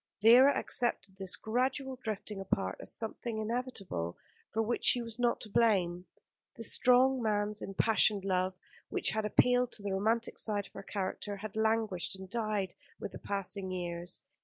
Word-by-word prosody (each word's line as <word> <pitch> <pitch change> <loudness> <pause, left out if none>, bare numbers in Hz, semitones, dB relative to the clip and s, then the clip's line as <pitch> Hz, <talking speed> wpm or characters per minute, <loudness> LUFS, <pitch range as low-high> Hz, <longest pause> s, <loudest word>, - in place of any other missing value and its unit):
Vera 250 +5 +7
accepted 200 -5 0
this 190 0 +2
gradual 260 +5 -1
drifting 215 -3 -5
apart 95 - -1
as - - -4
something 225 0 -4
inevitable, 215 - -3 0.3
for 225 +1 +1
which 235 +2 -2
she 245 - +6
was 230 -1 -4
not 240 -1 +2
to - - -3
blame. 185 -5 +2 0.5
The 230 - -8
strong 255 +3 +4
man's 210 -1 0
impassioned 200 0 +2
love, 185 -1 0 0.3
which - - +1
had 220 0 -1
appealed 250 +3 +3
to 205 - -6
the 200 -1 -2
romantic 225 +4 0
side 205 -2 -1
of - - -17
her - - -7
character, 200 +1 -4
had 215 +1 -7
languished 220 -5 0
and 190 0 -9
died 210 -3 -2 0.3
with - - -5
the - - -9
passing 195 -1 -2
years. 175 -1 -4
215 Hz, 160 wpm, -32 LUFS, 195-235 Hz, 0.5 s, Vera